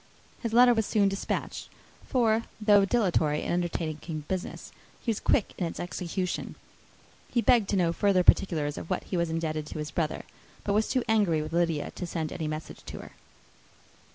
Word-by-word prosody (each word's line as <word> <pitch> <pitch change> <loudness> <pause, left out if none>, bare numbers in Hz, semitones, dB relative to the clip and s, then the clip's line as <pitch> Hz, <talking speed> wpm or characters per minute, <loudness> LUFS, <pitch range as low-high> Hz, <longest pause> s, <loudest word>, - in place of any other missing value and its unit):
His 230 - -2
letter 245 +1 +7
was 220 -3 0
soon 205 -3 +3
despatched; 195 0 -3 0.4
for 230 -3 +2
though 205 -2 +5
dilatory 180 -9 +1
in - - -1
undertaking 165 -2 -3
business, 185 -1 -4 0.3
he 235 - -1
was 220 - -2
quick 210 - +1
in 175 - 0
its - - -7
execution. 180 +1 -3 0.8
He 240 - +2
begged 235 -3 +4
to - - +1
know 170 -3 +2
further 195 -1 +3
particulars 155 -6 +3
of - - -9
what 185 - -1
he - - -5
was 170 -1 +1
indebted 155 -2 -2
to - - -7
his 150 -1 -4
brother; 160 -3 -2 0.4
but 200 - 0
was 215 +1 +2
too 255 -2 +1
angry 200 -9 +2
with 155 +1 -7
Lydia 165 -3 0
to 180 - -6
send 160 -2 -3
any 160 -3 -3
message 155 +1 -6
to - - -7
her. - - -12
180 Hz, 180 wpm, -28 LUFS, 160-210 Hz, 0.8 s, letter